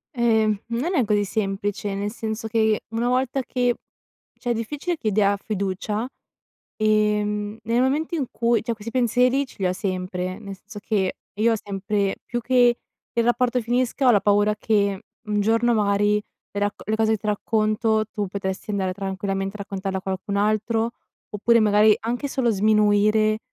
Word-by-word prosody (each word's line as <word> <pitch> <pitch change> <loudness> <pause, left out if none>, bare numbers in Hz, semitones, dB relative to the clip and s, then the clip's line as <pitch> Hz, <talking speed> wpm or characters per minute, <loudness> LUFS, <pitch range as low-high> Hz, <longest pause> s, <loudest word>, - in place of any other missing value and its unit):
Ehm, 220 -3 +2
non 250 +11 -2
è 250 - +3
così 205 -1 +2
semplice, 200 -1 -2
nel 205 +1 -2
senso 220 -1 -4
che 220 -1 +2
una 230 +2 -1
volta 260 +1 +1
che 245 -1 0 0.6
cioè 245 - -2
è - - +3
difficile 295 +10 -3
che 220 - -4
io 210 - +1
dia 200 -1 +3
fiducia, 205 +2 -2 0.7
ehm, 210 -1 +1
nei 230 +2 +1
momenti 295 +6 +1
in 285 - 0
cui 235 -1 +1
cioè 235 0 -2
questi 225 +1 -8
pensieri 250 +2 +2
ce - - -16
li 190 - -2
ho 180 - 0
sempre, 185 -1 -3
nel 200 -2 -8
senso 210 +2 -13
che 205 -3 0 0.2
io 225 +3 +2
ho - - +1
sempre 200 0 -2
più 240 - -3
che 245 -1 +4 0.3
il 235 - +1
rapporto 250 +1 +2
finisca, 250 +3 0
ho 245 - +8
la 205 - +4
paura 205 +1 +3
che 200 -3 +1 0.3
un 210 -1 0
giorno 230 +3 +2
magari 205 0 +2 0.3
racco 205 +1 -2
le 220 - 0
cose 220 0 +2
che 210 - -12
racconto 215 +1 +1
tu 205 -2 -2
potresti 190 +1 -4
andare 190 -2 -1
tranquillamente 195 0 -3
a - - -5
raccontarla 195 -1 -4
a - - -15
qualcun 190 +1 -3
altro, 215 +2 +1 0.4
oppure 230 +3 +3
magari 210 0 +5
anche 245 +5 -2
solo 250 -4 +1
sminuire 215 +1 +3
215 Hz, 170 wpm, -23 LUFS, 200-235 Hz, 0.7 s, ho